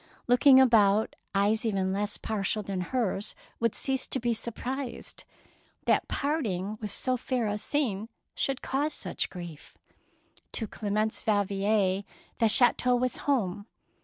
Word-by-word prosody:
Looking 260 +2 +6
about, 220 -4 +4 0.2
eyes 205 +3 +2
even 195 -4 0
less 205 +1 0
partial 215 0 -2
than 190 -2 -3
hers 210 -1 -2 0.2
would 230 -2 +1
cease 265 -1 +1
to 265 - -2
be 240 0 0
surprised 245 +4 -5 0.6
that - - +2
parting 215 - -2
with 210 - -3
so 255 +5 +1
fair 250 -1 -1
a 210 0 -1
scene 225 -6 -1 0.2
should 270 -2 -2
cause 290 +3 -1
such - - -3
grief. 175 -5 -10 0.8
To 225 - 0
Clemence 215 +1 -2
Yal 205 -2 +3
vier 195 0 +1 0.4
the 225 -2 +4
chateau 245 +2 +4
was 250 0 0
home. 205 -6 0
220 Hz, 135 wpm, -28 LUFS, 200-250 Hz, 0.8 s, Looking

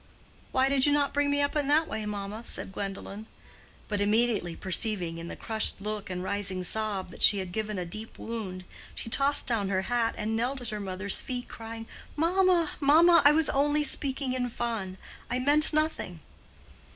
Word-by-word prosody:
"Why 260 0 +3
did 275 0 +3
you - - +4
not 285 -1 +1
bring 290 0 +1
me 285 0 +2
up 285 - -1
in 290 -2 0
that 310 +3 +3
way, 220 -1 -4
mamma?" 205 +2 -5
said 195 - +3
Gwendolen. 200 +2 -6 0.6
But 205 -2 -1
immediately 210 -4 +1
perceiving 185 -3 -1
in 165 - -7
the - - -6
crushed 220 -3 -1
look 210 0 -4
and 180 0 -4
rising 190 -1 -2
sob 210 -1 -2
that - - -12
she 205 - +7
had 185 -2 -4
given 215 +1 -3
a 180 - -3
deep 215 +6 -7
wound, 205 -5 -5 0.3
she - - -6
tossed 280 +3 +2
down 215 -5 +1
her 190 -1 0
hat 235 +1 0
and 220 +1 -2
knelt 250 +4 -1
at 245 -3 -6
her 210 0 -4
mother's 190 0 -1
feet 250 -1 -4
crying, 225 0 -8 0.3
"Mamma, 345 0 +3
mamma! 325 +4 +6
I 290 - +8
was 315 0 +3
only 290 +2 +2
speaking 270 -3 0
in 250 -1 -1
fun. 225 -6 -3 0.3
I 245 - 0
meant 290 +4 +3
nothing." 305 - -1
225 Hz, 190 wpm, -28 LUFS, 200-280 Hz, 0.6 s, I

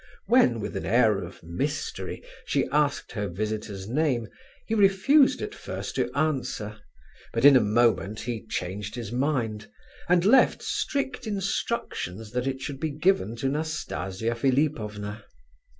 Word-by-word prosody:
When, 230 - +4
with 105 -1 -5
an 95 - -3
air 110 -2 +4
of 90 0 -9
mystery, 85 +1 -3 0.2
she - - +1
asked 150 0 +1
her 105 -3 -2
visitor's 105 +1 -4
name, 130 -2 0 0.4
he 225 - -3
refused 225 +7 +4
at 420 - -5
first - - -6
to - - -1
answer, 130 -8 -1 0.5
but 115 +3 +1
in 145 -1 +10
a - - +8
moment 110 -1 +2
he 115 -2 -5
changed 100 +3 -4
his 115 -3 -5
mind, 120 -5 -1 0.4
and 180 0 +4
left 250 +5 +5
strict 275 -5 -2
instructions 195 - -3
that 125 +2 -1
it 135 0 -2
should 140 -1 -5
be 160 - -1
given 150 - +1
to 120 +3 -2
Nastasia 115 - -2
Philipovna. 115 -5 -1
120 Hz, 140 wpm, -26 LUFS, 105-155 Hz, 0.5 s, in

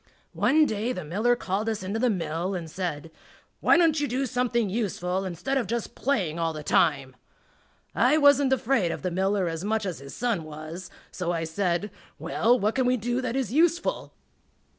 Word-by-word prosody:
One 310 0 +4
day 220 +1 -1
the 185 - -5
miller 210 +10 +1
called 210 -1 -2
us 215 -3 -3
into 200 +4 -3
the 250 +1 +2
mill 175 -1 -2
and 170 -3 -5
said, 165 -4 -4 0.5
"Why - - +5
don't 325 -3 +3
you 290 - 0
do 265 +2 -1
something 240 -2 0
useful 190 -3 -2
instead 185 +10 -2
of 240 - -3
just 235 +2 -3
playing 190 - -1
all 165 -1 0
the 155 -1 -7
time?" 135 -3 +1 0.8
I 255 +6 +3
wasn't 285 -2 +5
afraid 245 -8 +1
of - - -6
the 180 - -1
miller 190 +1 +1
as 165 +1 -4
much 215 +1 0
as 180 -4 -4
his 140 0 -10
son 230 -8 -1
was, 155 +4 -8 0.2
so 175 -2 -2
I 165 -1 -1
said, 175 +4 -1 0.3
"Well, 245 +2 +2
what 215 +1 +1
can 255 +1 +1
we 255 0 +3
do 240 +3 -1
that 250 -1 -3
is 260 -4 -2
useful?" 340 +3 +1
205 Hz, 190 wpm, -26 LUFS, 170-250 Hz, 0.8 s, Why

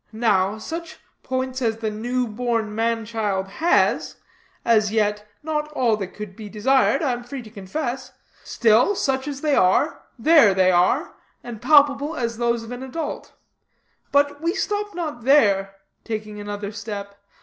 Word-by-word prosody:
Now, 210 -3 +1
such 330 +8 -7 0.2
points 260 0 -3
as 225 -2 0
the 220 -1 -3
new 245 +4 -1
born 230 -1 -2
man 225 0 0
child 210 -4 -2
has 320 - +1 0.5
as 215 -3 +3
yet 210 -1 0 0.2
not 300 -1 -2
all 240 -6 +2
that 195 -3 -6
could 210 -3 -8
be 215 -1 -9
desired, 265 +7 +2
I 275 - +1
am 245 0 -4
free 255 +1 -7
to 215 - -13
confess 250 +5 -5 0.3
still, 235 - +3
such 270 -4 -1
as 280 -2 -5
they 300 -2 +2
are, 280 - +2 0.2
there 250 - +5
they 185 -1 +4
are, 185 - +2 0.3
and 230 -3 -8
palpable 290 +1 +4
as 235 -4 -3
those 235 -1 0
of 225 - -10
an 245 +1 -6
adult. 265 +5 -5 0.8
But 285 +1 +2
we 335 +3 0
stop 415 -2 -2
not 305 -9 -4
here," 200 -8 +3 0.3
taking 215 -2 -5
another 205 0 -5
step. 200 -2 -7
235 Hz, 160 wpm, -22 LUFS, 210-280 Hz, 0.8 s, there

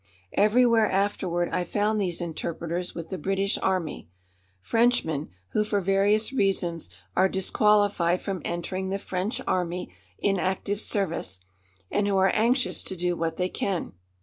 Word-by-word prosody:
Everywhere 225 +1 +4
afterward 185 -3 0
I 180 - 0
found 210 +4 0
these 180 -3 -1
interpreters 170 +1 -4
with 165 -1 -6
the 190 - -4
British 195 +4 0
Army 180 - -1 0.5
Frenchmen 165 - +1 0.2
who 210 - +1
for 210 -1 0
various 200 +5 +2
reasons 185 - +1 0.3
are 190 +1 +4
disqualified 195 -2 +3
from 195 -4 -4
entering 185 +2 -3
the 195 - -1
French 195 +4 -3
Army 175 - -1 0.2
in 195 -2 +1
active 190 +3 -1
service 165 - -1 0.5
and 205 0 +1
who 200 -1 +2
are 190 0 +4
anxious 240 +4 +2
to 190 - -2
do 175 0 0
what 165 -1 -2
they 180 - +1
can. 185 - -2
190 Hz, 145 wpm, -26 LUFS, 175-205 Hz, 0.5 s, Everywhere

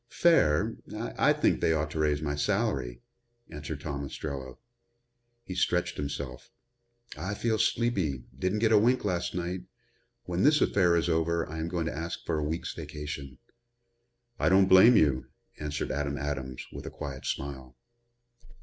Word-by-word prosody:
"Fair. 125 - +3 0.2
I - - +1
think - - +2
they 80 - +3
ought 75 -1 -1
to 80 - -4
raise 75 -1 +1
my 75 -1 -1
salary," 75 - -1 0.5
answered 75 0 -6
Tom 70 -2 -4
Ostrello. 70 -2 -6 0.9
He 95 - -6
stretched 90 -1 0
himself. 70 -3 -5 0.7
"I 95 +7 -4
feel 110 0 0
sleepy 95 - +1
didn't 95 +9 -1
get 110 - +3
a 110 - +7
wink 120 +2 +2
last 90 -3 -1
night. 90 +1 -3 0.6
When 90 0 -2
this 150 +2 +5
affair 90 -4 +3
is 85 0 +1
over 85 0 +1
I 80 +2 -6
am 80 - -2
going 85 -1 -2
to 80 - -3
ask 85 +2 -5
for 80 - 0
a - - -1
week's 80 +3 -3
vacation." 70 -3 -7 1.0
"I - - +3
don't 95 +1 +6
blame 100 +6 +8
you," 70 -8 +2 0.3
answered 75 -1 -3
Adam 75 0 -2
Adams, 65 -2 -4
with - - -7
a - - -3
quiet 65 -3 -7
smile. 65 -3 -5
80 Hz, 160 wpm, -29 LUFS, 70-90 Hz, 1.0 s, blame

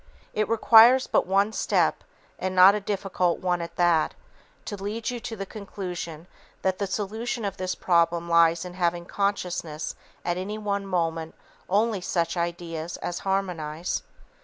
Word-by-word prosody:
It 215 0 0
requires 230 +3 +7
but - - +1
one 200 +3 +2
step, - - +1 0.4
and 185 0 -2
not 185 +2 +9
a 210 - 0
difficult 195 -3 -1
one 180 -1 -1
at 170 0 -7
that, 170 -3 +2 0.5
to 205 - -4
lead 210 +4 -3
you 245 - -4
to 225 0 -6
the 195 -2 -5
conclusion 180 -6 -6 0.4
that 190 -1 0
the 200 - -1
solution 220 +4 -3
of 195 -1 -3
this 185 0 -2
problem 170 -1 +2
lies 170 0 +4
in 180 - -7
having 175 -1 0
in - - -19
consciousness 180 -6 -2 0.3
at 175 0 0
any 200 +4 -4
one 200 -2 -2
moment 165 -3 -1 0.3
only 210 +1 +2
such 170 -1 -1
ideas 170 -1 -3
as 175 - -4
harmonize. 180 -4 -2
185 Hz, 160 wpm, -26 LUFS, 170-200 Hz, 0.5 s, not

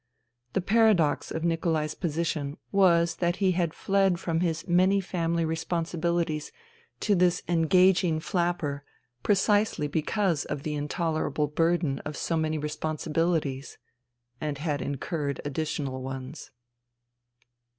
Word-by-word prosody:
The 195 - +1
paradox 200 -6 +3
of 160 - -4
Nikolai's 165 -2 0
position 155 -3 -2
was 170 -4 +4
that 175 0 +1
he 190 -1 +2
had 170 -2 0
fled 195 -2 +2
from 165 -1 -1
his 165 -2 -1
many 185 +3 +4
family 170 -3 -1
responsibilities 165 -1 -1 0.5
to 210 - +2
this 180 -2 +2
engaging 175 0 +3
flapper 170 -5 -1 0.4
precisely 205 -5 +2
because 165 +2 0
of 145 -2 -4
the 155 - -2
intolerable 155 0 -1
burden 165 -1 +1
of 150 -1 -6
so 165 - -1
many 155 -1 0
responsibilities 150 -1 -2 0.3
— 120 0 -44
and 150 -2 -2
had 145 -1 -2
incurred 145 0 -3
additional 145 -2 -3
ones. 130 +2 -7
165 Hz, 120 wpm, -27 LUFS, 150-175 Hz, 0.5 s, was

